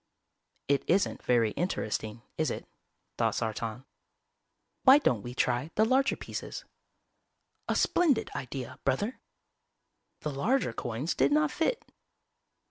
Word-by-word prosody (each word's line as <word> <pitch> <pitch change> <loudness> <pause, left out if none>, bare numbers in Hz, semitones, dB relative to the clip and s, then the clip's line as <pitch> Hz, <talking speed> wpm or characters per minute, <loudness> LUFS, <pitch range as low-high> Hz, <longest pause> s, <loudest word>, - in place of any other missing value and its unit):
"It 140 -1 +2
isn't 195 +3 +2
very 115 -3 +3
interesting, 110 - -2
is 155 - 0
it?" - - -5 0.5
thought - - +2
Sartan. 115 +2 -3 1.0
"Why 265 +1 +8
don't 125 - +1
we 120 +2 -7
try 125 +4 +1
the 215 - +4
larger 265 +4 +3
pieces?" - - -6 1.0
"A - - +1
splendid 295 -10 +2
idea, 130 -1 -5
Brother." 205 - 0 1.0
The 150 - -2
larger 175 - +1
coins 120 +7 -2
did 135 +2 +2
not 150 0 +3
fit. 395 +9 -1
140 Hz, 120 wpm, -30 LUFS, -, 1.0 s, Why